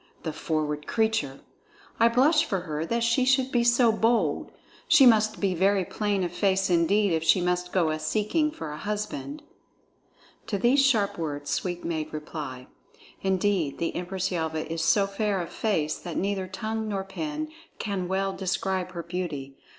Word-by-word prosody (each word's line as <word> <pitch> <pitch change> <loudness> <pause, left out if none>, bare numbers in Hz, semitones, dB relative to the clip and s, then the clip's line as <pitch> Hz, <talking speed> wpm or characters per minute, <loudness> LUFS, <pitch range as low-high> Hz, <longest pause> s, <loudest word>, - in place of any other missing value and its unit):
The 160 - -3
forward 150 -1 -2
creature! 220 -12 0 0.6
I 230 - +6
blush 285 +7 +4
for 195 -5 -2
her 155 -1 -4
that 235 +3 0
she 235 +2 +3
should 265 0 +2
be 240 -1 +2
so 240 0 +4
bold. 220 -8 +1 0.4
She 305 -5 +7
must 215 -3 +4
be 195 -2 +1
very 190 +2 +2
plain 205 -1 -1
of 175 - -2
face 190 +1 +1
indeed 185 +3 +3
if 160 0 0
she 165 +3 +4
must 180 0 -1
go 170 -4 +2
a 155 - -2
seeking 220 - 0
for 160 - -7
a 150 - -7
husband." 210 - -4 1.0
To 205 - -1
these 255 +7 +4
sharp 220 -9 +2
words 145 -3 -4
Sweep 175 -1 -2
made 160 -2 -3
reply: 150 -4 -6 0.6
"Indeed, 190 -5 0
the 165 - -2
Empress 185 +1 -2
Yelva 160 -2 -2
is 165 0 -3
so 200 +4 +4
fair 200 0 -1
of 170 - -5
face 160 -9 0
that 175 -3 -6
neither 195 -1 -1
tongue 220 +3 -3
nor 200 -2 -2
pen 300 +10 -4 0.3
can 195 -4 -3
well 195 +1 -1
describe 190 -1 -2
her 170 -1 -5
beauty. 160 -6 -5
190 Hz, 170 wpm, -26 LUFS, 165-220 Hz, 1.0 s, She